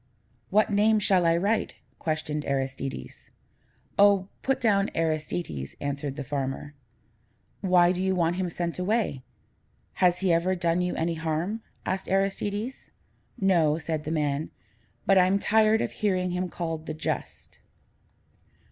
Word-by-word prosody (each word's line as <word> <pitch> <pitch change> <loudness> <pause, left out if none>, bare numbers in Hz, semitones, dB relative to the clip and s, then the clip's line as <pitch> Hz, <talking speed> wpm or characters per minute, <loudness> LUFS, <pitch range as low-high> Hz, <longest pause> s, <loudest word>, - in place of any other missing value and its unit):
"What 215 +1 +3
name 215 +2 +4
shall 190 -4 +3
I 165 0 +4
write?" 205 +6 0 0.2
questioned 155 -1 -2
Aristides. 135 - -4 0.7
"Oh, 200 -1 +5
put 270 -1 0
down 200 -4 +2
'Aristides,'" 155 - -2
answered 140 -1 -3
the 145 - -4
farmer. 140 +1 -4 0.9
"Why 180 -2 +5
do 185 0 -1
you 190 0 +1
want 170 0 +1
him 185 -1 -1
sent 170 +1 -3
away? 195 - 0 0.8
Has 180 0 +4
he 185 -3 +3
ever 175 +3 +2
done 175 0 +1
you 180 0 -1
any 165 +1 0
harm?" 165 +7 -2 0.2
asked 190 +1 -2
Aristides. 205 +5 -1 0.5
"No," 170 -6 +3
said 160 -1 -3
the 155 - -5
man, 150 -1 -1 0.6
"but 195 -1 +5
I'm 185 +2 +4
tired 220 +2 +3
of - - -2
hearing 185 -3 0
him 180 0 -2
called 165 -2 -4
the 155 - -4
Just." 155 - -5
175 Hz, 140 wpm, -27 LUFS, 155-195 Hz, 0.9 s, Oh